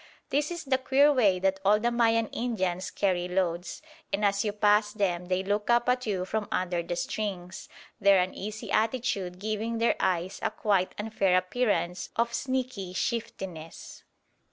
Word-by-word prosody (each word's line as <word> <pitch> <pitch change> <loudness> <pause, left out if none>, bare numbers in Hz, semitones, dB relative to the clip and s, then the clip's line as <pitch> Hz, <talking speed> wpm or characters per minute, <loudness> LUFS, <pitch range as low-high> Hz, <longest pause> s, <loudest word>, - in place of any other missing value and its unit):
This 290 +2 +1
is 345 -2 -5
the 265 -2 +1
queer 280 +3 +4
way 210 -8 +4
that 190 +1 0
all 205 +2 +4
the 240 +2 +1
Mayan 230 -1 +3
Indians 190 -6 -2
carry 180 -3 0
loads; 180 - -2 0.3
and 205 +1 +1
as 200 0 +2
you 210 - 0
pass 210 0 +3
them 180 -4 -1
they 185 +1 0
look 205 +3 -1
up 240 0 +3
at 250 -1 +1
you 190 -3 -1
from 215 +2 -2
under 180 -1 0
the 170 +1 -4
strings, 190 -2 -4 0.3
their 200 -1 +5
uneasy 200 +4 -4
attitude 220 -5 0
giving 215 +3 -2
their 230 +1 +2
eyes 185 0 0
a - - +1
quite 200 -4 0
unfair 205 -4 +1
appearance 185 -3 0
of 235 0 0
sneaky 255 -9 -2
shiftiness. 185 -7 -5
205 Hz, 160 wpm, -28 LUFS, 185-230 Hz, 0.3 s, their